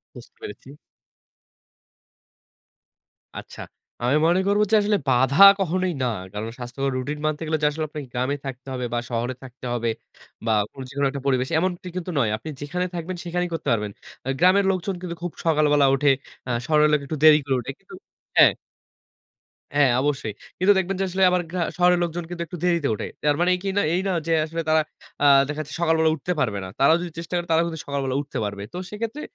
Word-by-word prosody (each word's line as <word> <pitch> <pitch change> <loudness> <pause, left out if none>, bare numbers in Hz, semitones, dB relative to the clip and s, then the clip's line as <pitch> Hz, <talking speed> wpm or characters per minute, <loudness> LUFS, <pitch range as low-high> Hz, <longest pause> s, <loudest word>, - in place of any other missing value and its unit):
বুঝতে 460 - -13
পেরেছি। 420 - -9 2.7
আচ্ছা। - - -9 0.4
আমি 125 +4 +2
মনে 175 +2 +3
করব 205 +1 +3
যে - - +6
আসলে 205 0 +2
বাধা 130 +2 +2 0.2
কখনোই 185 -1 0
না। - - +2 0.3
কারণ 105 +2 -4
স্বাস্থ্যকর 135 +2 -3
রুটিন 150 +4 -4
মানতে 155 +1 -1
গেলে 155 - +1
যে 150 - +5
আসলে 155 +1 -3
আপনাকে 150 -2 -7
গ্রামে 130 +3 -1
থাকতে 130 0 -7
হবে 125 -1 -3
বা 120 - +1
শহরে 120 +1 -2
থাকতে 130 0 -11
হবে 120 -1 -1 0.6
বা 115 - +1 0.2
কোন 135 - -10
যেকোনো 140 +1 -1
একটা 140 0 -6
পরিবেশে 130 -1 +1
এমনটি 180 +1 -2
কিন্তু 180 0 -4
নয়। 110 -5 +2
আপনি 155 - -8
যেখানে 180 +5 -2
থাকবেন 175 +2 -4
সেখানেই 180 +1 -2
করতে 165 - -5
পারবেন। 105 -2 -2 0.4
আ - - -1
গ্রামের 190 +2 +5
লোকজন 190 +1 -2
কিন্তু 175 -2 -5
খুব 175 - -3
সকালবেলা 150 -3 +4
উঠে, 140 +1 +2 0.4
আ - - -5 0.2
শহরের 150 0 +4
লোক 150 - +3
একটু 155 +2 -4
দেরি 155 -1 +9
করে 135 -2 +1
উঠে - - -5
কিন্তু - - -16 0.4
হ্যাঁ। - - +8 1.2
হ্যাঁ 140 -4 +5
অবশ্যই 135 -6 -1 0.3
কিন্তু 195 +3 +5
দেখবেন 190 +1 0
যে - - +1
আসলে 190 +1 +1
আবার 180 -1 +1
গ্রা 180 -1 -2 0.2
শহরের 180 0 +4
লোকজন 170 0 -3
কিন্তু 175 -1 -6
একটু 175 +2 -8
দেরিতে 170 -5 +2
উঠে। - - -4 0.2
তার 145 -1 +3
মানেই 180 +1 +3
কি 195 - -1
না 200 - +4
এই 180 - +1
না 195 - +1 0.2
যে 165 - +2
আসলে 165 +1 -4
তারা 155 0 +4 0.4
আ - - +5 0.2
দেখা 150 +1 -4
যাচ্ছে 150 -1 -8
সকালবেলা 160 -1 +3
উঠতে 160 +4 -4
পারবে 110 -8 0
না। - - -7
তারাও 160 +4 +5
যদি 175 -2 -5
চেষ্টা 165 +1 -7
করে 175 0 -3
তারাও 165 +1 +4
কিন্তু 160 -2 -6
সকালবেলা 135 -2 -2
উঠতে 145 - -7
পারবে। 100 -1 -5
তো - - -5
সেক্ষেত্রে 230 +7 -5
155 Hz, 200 wpm, -23 LUFS, 135-180 Hz, 2.7 s, দেরি